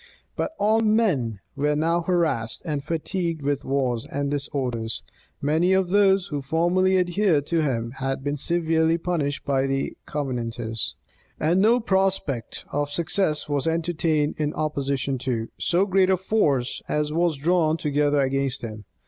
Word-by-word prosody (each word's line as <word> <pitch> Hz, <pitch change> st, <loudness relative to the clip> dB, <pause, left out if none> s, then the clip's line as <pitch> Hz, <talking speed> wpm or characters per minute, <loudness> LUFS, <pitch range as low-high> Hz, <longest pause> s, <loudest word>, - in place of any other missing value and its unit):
But -, -, -2 dB
all 215 Hz, +2 st, +3 dB
men 190 Hz, -, +1 dB
were 150 Hz, +1 st, +1 dB
now 165 Hz, +3 st, +1 dB
harassed 165 Hz, -10 st, 0 dB
and 150 Hz, -4 st, -2 dB
fatigued 165 Hz, 0 st, -2 dB
with 140 Hz, 0 st, -1 dB
wars 130 Hz, -4 st, 0 dB
and 140 Hz, 0 st, -2 dB
disorders: 130 Hz, -6 st, -2 dB, 0.4 s
many 160 Hz, +6 st, +3 dB
of 190 Hz, -2 st, +2 dB
those 195 Hz, -1 st, +4 dB
who 145 Hz, -3 st, -3 dB
formerly 175 Hz, +6 st, +2 dB
adhered 175 Hz, -4 st, +2 dB
to 165 Hz, +1 st, +1 dB
him, 120 Hz, -6 st, -1 dB
had 135 Hz, 0 st, -2 dB
been 145 Hz, +1 st, -1 dB
severely 165 Hz, +1 st, +1 dB
punished 165 Hz, -5 st, -2 dB
by 135 Hz, -1 st, +1 dB
the 135 Hz, 0 st, -2 dB
Covenanters: 120 Hz, -5 st, -3 dB, 0.4 s
and 170 Hz, +5 st, +2 dB
no 230 Hz, +4 st, +5 dB
prospect 190 Hz, -, -1 dB
of 145 Hz, 0 st, -1 dB
success 155 Hz, +1 st, 0 dB
was 145 Hz, 0 st, 0 dB
entertained 160 Hz, -2 st, 0 dB
in 150 Hz, -1 st, -1 dB
opposition 140 Hz, -3 st, -1 dB
to 120 Hz, -3 st, -2 dB
so 180 Hz, +3 st, +2 dB
great 190 Hz, -1 st, +3 dB
a 190 Hz, -, +4 dB
force 150 Hz, -, +1 dB
as 150 Hz, 0 st, 0 dB
was 170 Hz, -2 st, +1 dB
drawn 160 Hz, +1 st, +2 dB
together 145 Hz, -1 st, +1 dB
against 135 Hz, 0 st, -1 dB
him. 110 Hz, -2 st, -7 dB
150 Hz, 150 wpm, -24 LUFS, 135-175 Hz, 0.4 s, no